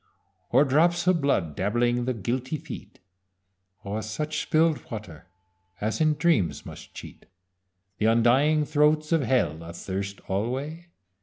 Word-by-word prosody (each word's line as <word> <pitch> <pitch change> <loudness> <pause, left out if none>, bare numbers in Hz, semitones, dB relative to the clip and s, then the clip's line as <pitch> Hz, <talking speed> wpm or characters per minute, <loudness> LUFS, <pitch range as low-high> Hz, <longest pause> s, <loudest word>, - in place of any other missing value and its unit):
Or 140 - +5
drops 170 +6 +3
of 180 -3 +3
blood 95 - 0
dabbling 120 +4 +1
the 130 -1 -1
guilty 125 - -2
feet? - - -10 0.9
Or 105 +2 -3
such 150 +9 -3
spill'd 160 -1 +1
water 105 -8 -8 0.5
as 110 +8 -2
in 155 -1 +3
dreams 145 - +1
must - - -11
cheat - - -11 0.7
The 110 - +2
undying 130 +7 +4
throats 150 +1 +2
of 165 -2 +3
Hell, 85 - 0
athirst 95 +4 -5
alway? 135 - -3
130 Hz, 130 wpm, -26 LUFS, 105-155 Hz, 0.9 s, Or